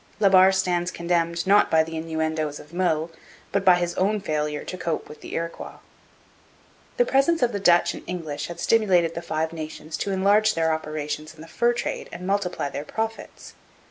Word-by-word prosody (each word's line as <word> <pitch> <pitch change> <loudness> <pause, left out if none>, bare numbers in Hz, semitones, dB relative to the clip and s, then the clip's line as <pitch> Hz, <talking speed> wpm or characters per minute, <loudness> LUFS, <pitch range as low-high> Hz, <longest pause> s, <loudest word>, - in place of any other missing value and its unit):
La 200 -2 +5
Barre 190 0 +7
stands 180 -2 0
condemned 170 0 -1
not 200 +2 +5
by 160 0 +4
the 165 0 -7
innuendoes 160 -2 -2
of 150 +3 -15
Meulles, 165 -3 0 0.4
but 200 -1 0
by 185 -2 +7
his 175 -1 -1
own 205 +3 +1
failure 150 -5 -2
to - - -6
cope 170 -3 -3
with 150 - -12
the - - -7
Iroquois. 165 0 -5 1.2
The - - +4
presence 275 - +2
of 240 - +2
the 200 - -3
Dutch 175 -2 +4
and - - -8
English 165 -5 -4
had 170 - -8
stimulated 185 -7 +3
the 170 - -5
Five 160 -1 -2
Nations 155 0 -6
to - - -3
enlarge 200 +3 +3
their 160 -1 +2
operations 155 0 -4
in 155 - -14
the 165 - -11
fur 240 +7 +1
trade 240 - -4
and 180 - -7
multiply 190 -5 -1
their 140 - -5
profits. 220 +7 -5
170 Hz, 190 wpm, -24 LUFS, 160-195 Hz, 1.2 s, Barre